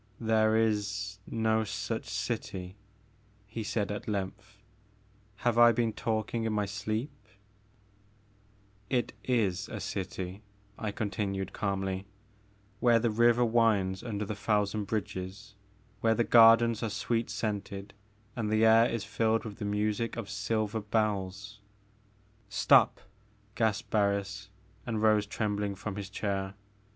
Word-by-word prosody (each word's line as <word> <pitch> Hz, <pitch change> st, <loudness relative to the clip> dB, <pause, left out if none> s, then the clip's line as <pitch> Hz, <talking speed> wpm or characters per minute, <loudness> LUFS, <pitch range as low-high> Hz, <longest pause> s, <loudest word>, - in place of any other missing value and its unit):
"There 110 Hz, -1 st, +3 dB
is 105 Hz, -2 st, 0 dB
no 110 Hz, -1 st, +1 dB
such 105 Hz, -, -3 dB
city," 90 Hz, 0 st, -4 dB, 0.7 s
he 110 Hz, +3 st, -6 dB
said 105 Hz, -1 st, -1 dB
at 105 Hz, +4 st, -5 dB
length, 105 Hz, +1 st, -4 dB, 0.4 s
" 105 Hz, 0 st, -33 dB
have 120 Hz, -1 st, +3 dB
I 120 Hz, 0 st, +8 dB
been 115 Hz, -1 st, 0 dB
talking 110 Hz, +1 st, -2 dB
in 110 Hz, -1 st, -1 dB
my 105 Hz, -1 st, +1 dB
sleep? 110 Hz, +7 st, -3 dB, 1.0 s
" 105 Hz, -1 st, -34 dB
"It -, -, -5 dB
is 105 Hz, -5 st, 0 dB
a 110 Hz, -, -5 dB
city," 95 Hz, -1 st, -5 dB, 0.3 s
I 110 Hz, -, -3 dB
continued, 100 Hz, -2 st, -3 dB
calmly, 95 Hz, -1 st, -2 dB, 0.7 s
"where 120 Hz, -2 st, +5 dB
the 115 Hz, 0 st, +1 dB
river 120 Hz, +2 st, +4 dB
winds 110 Hz, -5 st, +2 dB
under 105 Hz, -3 st, -3 dB
the 105 Hz, -, -3 dB
thousand 105 Hz, 0 st, 0 dB
bridges, 100 Hz, 0 st, -4 dB, 0.5 s
where 115 Hz, 0 st, +3 dB
the 120 Hz, -, +2 dB
gardens 115 Hz, 0 st, +6 dB
are 115 Hz, -, -1 dB
sweet 110 Hz, +3 st, -1 dB
scented 100 Hz, -3 st, -4 dB, 0.4 s
and 110 Hz, -3 st, -2 dB
the 110 Hz, +1 st, +3 dB
air 115 Hz, +1 st, +6 dB
is 115 Hz, -3 st, -2 dB
filled 110 Hz, +1 st, 0 dB
with 105 Hz, -1 st, -8 dB
the 105 Hz, -, -3 dB
music 105 Hz, +3 st, -1 dB
of 115 Hz, -2 st, -5 dB
silver 110 Hz, +1 st, -1 dB
bells 105 Hz, -1 st, -2 dB, 0.2 s
' 105 Hz, 0 st, -35 dB
' -, -, -35 dB, 0.2 s
"Stop!" 100 Hz, -, +4 dB, 0.5 s
gasped 110 Hz, -2 st, 0 dB
Barris, 100 Hz, -1 st, 0 dB, 0.3 s
and 115 Hz, -3 st, -2 dB
rose 105 Hz, -1 st, +4 dB
trembling 105 Hz, -2 st, -2 dB
from 95 Hz, +1 st, -5 dB
his 100 Hz, -2 st, -5 dB
chair. 100 Hz, -1 st, -3 dB
105 Hz, 135 wpm, -30 LUFS, 100-110 Hz, 1.0 s, I